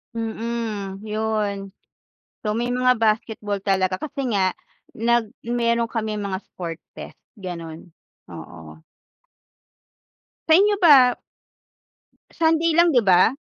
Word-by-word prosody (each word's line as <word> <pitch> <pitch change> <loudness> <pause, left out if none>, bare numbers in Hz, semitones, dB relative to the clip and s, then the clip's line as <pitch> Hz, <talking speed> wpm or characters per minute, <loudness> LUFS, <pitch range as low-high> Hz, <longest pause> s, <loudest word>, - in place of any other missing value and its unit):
Mhm, 220 -3 -4
yun. 210 -2 -3 0.7
So 210 0 -2
may 240 +1 -1
mga 250 0 +3
basketball 215 -2 -1
talaga 190 -1 0
kasi 275 -5 -4
nga 190 -2 +1 0.4
nag 230 0 +1 0.2
meron 235 0 +1
kaming 215 -3 -3
mga 190 -1 -3
sport 170 -4 -8 0.2
fest - - -10 0.2
gano'n, 170 -3 -8 0.4
oo. - - -11 1.7
Sa 315 - +6
inyo 410 +3 +5
ba 275 -9 +6 1.2
Sunday 325 0 +2
lang, 340 +1 +5
di 250 -7 +4
ba? 185 +1 +6
220 Hz, 105 wpm, -22 LUFS, 195-245 Hz, 1.7 s, Sa